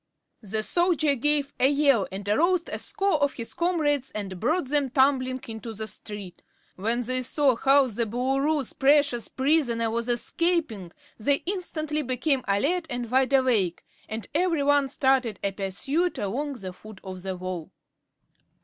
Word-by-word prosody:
The 215 0 -2
soldier 335 -1 +2
gave 285 +1 +1
a 260 - +5
yell 280 -8 +3
that 195 +1 -7
aroused 340 - +2
a - - -4
score 390 -6 0
of 285 -1 +2
his 230 -2 -6
comrades 300 -6 0
and 195 -3 -6
brought 275 - 0
them 285 -2 +1
tumbling 260 -1 +2
into 225 0 -7
the 220 +1 -4
street. 205 -4 -6 0.3
When 225 +6 0
they 255 +2 -1
saw 265 0 +2
how 275 +3 +4
the 235 -1 -2
Boolooroo's 270 +4 0
precious 280 -3 +3
prisoner 260 -5 +1
was 235 +1 -2
escaping 240 - -1 0.3
they 280 +6 +1
instantly 315 -5 -2
became 260 +1 0
alert 300 - +1
and 245 -2 -4
wide 265 +1 +2
awake, 235 -10 +2 0.2
and 220 0 -5
every 330 -2 +1
one 285 -1 +3
started 265 -6 +1
in 200 -1 -1
pursuit 270 - -1
along 275 +9 -2
the 190 -8 -7
foot 215 +1 -13
of 185 -1 -7
the 190 0 -4
wall. 180 -3 -5
260 Hz, 155 wpm, -26 LUFS, 220-290 Hz, 0.3 s, a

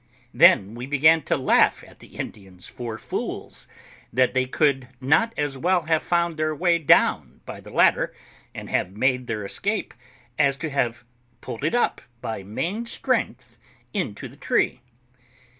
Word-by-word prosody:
Then 100 +1 +5
we 120 +2 -7
began 155 +3 +4
to - - +1
laugh 130 - +3
at - - -18
the - - -16
Indians 95 -3 -8
for 115 -2 -6
fools, - - -6 0.4
that 125 +1 +2
they 130 0 +1
could 135 -2 +1
not 160 - +2
as 145 -2 -2
well 180 +3 +2
have 160 0 +1
found 170 -2 0
their 155 0 -1
way 170 +1 +2
down 155 - +3
by - - -8
the - - -13
ladder, - - +3 0.4
and - - -7
have 95 +3 -2
made 125 +1 +1
their 105 -3 -3
escape, 205 - -2 0.5
as 140 -2 +3
to 155 0 -4
have 120 -3 -1 0.3
pulled 125 0 -8
it 155 - +1
up 245 - +1 0.2
by 110 -4 -5
main 175 - -4
strength 130 - -2 0.3
into 105 - -3
the - - -16
tree. 130 - 0
135 Hz, 160 wpm, -24 LUFS, 120-160 Hz, 0.5 s, Then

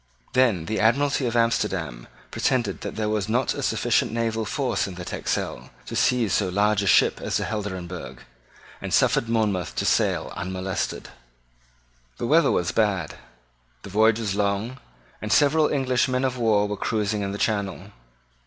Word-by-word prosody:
Then 120 -10 +3
the 110 +3 -2
Admiralty 135 +4 +2
of 120 - -3
Amsterdam 115 - 0 0.2
pretended 125 -2 0
that - - -5
there 110 -1 -1
was 105 -1 -1
not 125 +3 +1
a - - -5
sufficient - - +1
naval 115 -1 -1
force 125 -3 -1
in 95 - -8
the 90 0 -7
Texel - - -3 0.2
to - - -6
seize 120 -6 +2
so 100 -3 +1
large 105 +2 +2
a 100 - -2
ship - - +4
as - - -1
the - - -2
Helderenbergh, 95 -4 -5 0.6
and - - -5
suffered 115 - +2
Monmouth 105 -6 0
to - - -1
sail - - +1
unmolested. 95 +1 -4 1.1
The - - -3
weather 160 +7 +4
was 90 +1 0
bad: 100 -7 0 0.7
the 100 - -9
voyage 110 +2 +4
was 110 -4 -2
long; 100 +5 -1 0.4
and 110 - -4
several 150 +3 +4
English 130 -3 +1
men 130 0 -1
of 130 -1 -1
war 110 -4 +2
were 105 0 -4
cruising 105 0 -1
in 100 -1 -2
the 100 - -4
channel. 100 -3 -2
110 Hz, 165 wpm, -24 LUFS, 100-120 Hz, 1.1 s, ship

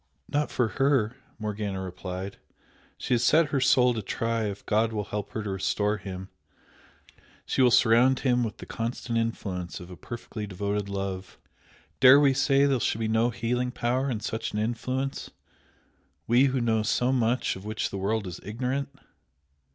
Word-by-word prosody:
"Not 145 +1 0
for 120 - +1
her!" 130 -3 +1 0.2
Morgana 105 -2 -3
replied 95 +1 -6 0.6
"She - - -2
has 120 -1 +2
set 155 +4 +4
her 140 -2 0
soul 125 -1 +4
to 110 - -3
try 115 +2 -1
if 100 -1 -5
God 110 +2 +2
will 105 -2 -2
help 105 0 -5
her 110 - -3
to 100 - -3
restore 105 +2 0
him, 95 -1 -7 1.2
she - - 0
will 125 - +6
surround 120 +2 +4
him 125 -2 +2
with 110 -2 -4
the - - -9
constant 115 0 -3
influence 95 -6 -3
of 90 +1 -10
a - - -8
perfectly 110 +1 -7
devoted 100 +1 -2
love. 95 -1 -4 0.6
Dare 130 +2 +9
we 140 -2 +4
say 135 +1 +3
there 135 -3 +2
shall 110 - 0
be 110 - 0
no 110 +2 +2
healing 120 +1 -1
power 125 +2 -1
in 110 -5 -2
such 110 +1 -3
an - - -2
influence? 130 +5 -2 1.0
we 120 +4 +5
who 130 -1 +1
know 115 -2 +1
so 120 +4 +1
much 120 -1 +1
of 95 - -10
which 110 +1 -3
the 100 - -4
world 105 +2 -1
is 90 -1 -6
ignorant!" 125 +6 -3
115 Hz, 175 wpm, -27 LUFS, 105-125 Hz, 1.2 s, Dare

